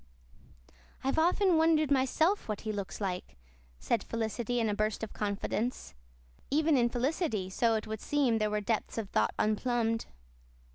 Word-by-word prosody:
"I've 270 +4 +1
often 355 +1 +3
wondered 315 -2 +3
myself 315 +8 +2
what 210 - -3
he 215 - -3
looks 200 -2 -5
like," 180 - -4 0.4
said 210 - 0
Felicity 230 +1 -2
in 225 - +1
a 210 - 0
burst 215 +1 -1
of 220 - -5
confidence. 210 +4 -2 0.6
Even 305 +2 +3
in 240 -2 +3
Felicity, 240 - -1
so 230 +3 +2
it 215 - -2
would 220 -1 -5
seem, 265 -6 +1
there 215 0 +1
were 210 0 -1
depths 220 +1 -2
of 215 -4 -4
thought 105 - +1
unplumbed. 225 +1 0
230 Hz, 155 wpm, -31 LUFS, 215-275 Hz, 0.6 s, often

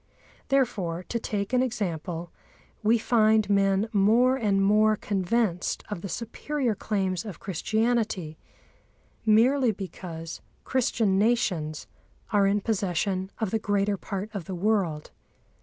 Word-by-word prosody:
Therefore, 195 -11 0
to 235 - -1
take 205 0 -3
an 250 - +4
example, 175 -8 -3 0.5
we 220 +2 +4
find 220 -2 +3
men 195 +1 +3
more 225 +6 +4
and 210 -6 +1
more 215 +1 +4
convinced 200 -1 -1
of 180 - -4
the 195 - -5
superior 245 - -2
claims 190 -4 -2
of 205 -5 -8
Christianity, 215 -3 -1 0.9
merely 240 +4 +4
because 170 -4 -7 0.2
Christian 225 -6 +1
nations 180 -9 0 0.5
are 200 -2 +4
in 205 +1 +1
possession 190 -2 -1
of 220 -5 -2
the 225 - +1
greater 205 -1 +1
part 200 +2 -5
of 195 -6 -5
the 185 - -5
world. 180 -6 0
205 Hz, 125 wpm, -27 LUFS, 185-225 Hz, 0.9 s, an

